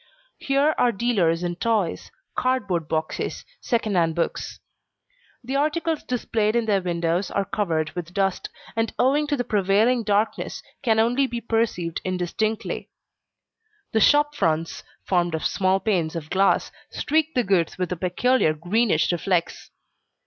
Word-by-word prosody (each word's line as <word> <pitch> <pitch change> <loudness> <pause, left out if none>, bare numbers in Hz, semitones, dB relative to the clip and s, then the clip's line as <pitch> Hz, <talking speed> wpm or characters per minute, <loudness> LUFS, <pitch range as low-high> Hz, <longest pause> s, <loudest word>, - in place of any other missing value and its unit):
Here 280 +3 +2
are 245 - +4
dealers 190 -7 +1
in 175 -1 -2
toys, 215 -4 -1 0.3
cardboard 200 -11 0
boxes, 160 0 -3
second 225 -4 -1
hand 165 -2 +2
books. 170 - -3 0.8
The 260 +3 -4
articles 310 +2 0
displayed 225 -3 -1
in 235 -1 +2
their 200 -3 +2
windows 170 +1 -1
are 200 - -1
covered 160 -7 -1
with 175 -1 -6
dust, 195 0 -1 0.3
and 225 0 -1
owing 285 +4 +2
to 290 -1 0
the 245 - 0
prevailing 215 +4 +2
darkness, 210 0 -1 0.2
can 225 -5 +2
only 245 +5 +3
be 240 -2 -4
perceived 225 -8 -1
indistinctly. 185 +4 -2 1.0
The 220 - +2
shop 295 +6 +4
fronts, 165 - -1 0.2
formed 175 -3 +1
of 160 - -4
small 190 0 +2
panes 180 -5 0
of 155 -2 -6
glass, 195 +1 +2 0.2
streak 315 +1 0
the 250 - +3
goods 190 -5 +1
with 180 -1 -2
a - - 0
peculiar 180 +1 +1
greenish 175 +2 +1
reflex. 175 0 -1
200 Hz, 140 wpm, -24 LUFS, 175-240 Hz, 1.0 s, are